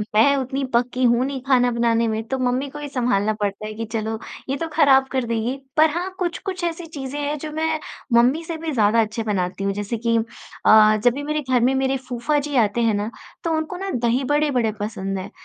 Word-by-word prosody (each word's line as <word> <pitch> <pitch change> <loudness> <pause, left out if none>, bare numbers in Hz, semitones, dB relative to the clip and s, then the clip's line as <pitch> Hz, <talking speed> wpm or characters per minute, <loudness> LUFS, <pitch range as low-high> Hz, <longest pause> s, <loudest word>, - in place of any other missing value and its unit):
मैं 280 +6 +5
उतनी 270 +1 -2
पक्की 250 +2 +1
तो 240 - +6
हूँ 240 +2 +2
नहीं 270 -1 -4
खाना 245 -2 +4
बनाने 230 -1 +2
में 220 0 -1
तो 265 - -1
मम्मी 255 +2 0
को 295 +2 -9
ही 295 - -5
संभालना 235 -5 +1
पड़ता 205 0 -3
है 215 - -5
कि 225 +1 -5
चलो 220 0 -3 0.3
ये 275 - 0
तो 330 - -3
खराब 270 -4 +5
कर 260 -2 0
देगी। 230 +3 -1 0.2
पर 315 0 +6
हाँ, 350 +4 -2
कुछ-कुछ 365 +1 -3
ऐसी 340 0 -2
चीज़ें 285 -3 -6
हैं 290 +1 -2
जो 305 +1 -6
मैं 315 0 -1 0.3
मम्मी 250 +8 +4
से 330 0 -5
भी 320 0 -4
ज़्यादा 225 -2 +3
अच्छी 220 +1 -2
बनाती 195 -3 -2
हूँ 195 0 0
जैसे 205 +3 -3
कि 230 0 +1 0.5
अ, 215 0 +7
जब 245 - +5
भी 285 +3 -5
मेरे 300 +1 -1
घर 250 -2 +3
में 255 +2 +3
मेरे 265 0 +1
फूफाजी 285 +4 -1
आते 230 0 +2
हैं 225 -2 +3
ना, 205 +3 -2 0.3
तो 335 - -1
उनको 315 +3 -3
ना 390 +1 -4
दही-बड़े 265 +5 +1
बड़े 235 -4 +1
पसंद 195 -2 -3
हैं। 185 - -7
250 Hz, 225 wpm, -22 LUFS, 225-290 Hz, 0.5 s, अ